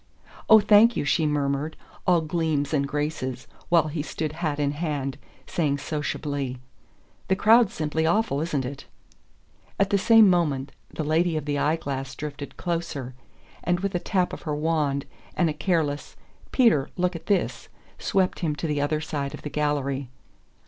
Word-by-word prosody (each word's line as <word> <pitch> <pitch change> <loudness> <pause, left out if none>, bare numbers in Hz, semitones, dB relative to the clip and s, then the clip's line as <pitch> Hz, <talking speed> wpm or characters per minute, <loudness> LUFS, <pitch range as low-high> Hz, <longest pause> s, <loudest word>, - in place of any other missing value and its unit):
"Oh, 220 - +10
thank 215 +2 +5
you," - - -1
she 155 +2 +2
murmured, 145 +1 -1 0.3
all 175 -2 +5
gleams 155 -3 -1
and 140 -2 +1
graces, 140 -4 -3 0.2
while 165 -3 +4
he 155 0 -3
stood 155 0 -3
hat 155 -2 -2
in 145 -1 +1
hand, 145 -3 -3 0.3
saying 145 -4 0
sociably: 145 -2 -3 0.7
"The 190 - +3
crowd's 220 +2 +5
simply 160 +1 0
awful, 170 -5 +1
isn't 150 -5 -1
it?" 135 +2 -7 0.9
At 200 0 +2
the 200 - +3
same 225 +1 +7
moment 150 -7 +1 0.2
the 155 - -3
lady 160 +2 +1
of 150 - -4
the 145 -1 -1
eye 150 +3 +2
glass 135 -4 -5
drifted 145 -1 -7
closer, 165 -7 -3 0.5
and 175 +1 +1
with 200 0 -2
a 175 - 0
tap 185 0 0
of - - -6
her 150 -2 -3
wand, 150 -3 0 0.3
and 170 -3 +2
a - - -4
careless 155 -5 -1 0.4
"Peter, 225 - +3
look 180 0 0
at 165 - -8
this," 200 -3 0 0.3
swept 190 -2 +1
him 155 -4 -1
to 155 - -4
the 150 -2 0
other 150 +1 0
side 140 -3 -3
of - - -13
the 150 - -5
gallery. 140 -3 -1
155 Hz, 170 wpm, -25 LUFS, 145-175 Hz, 0.9 s, Oh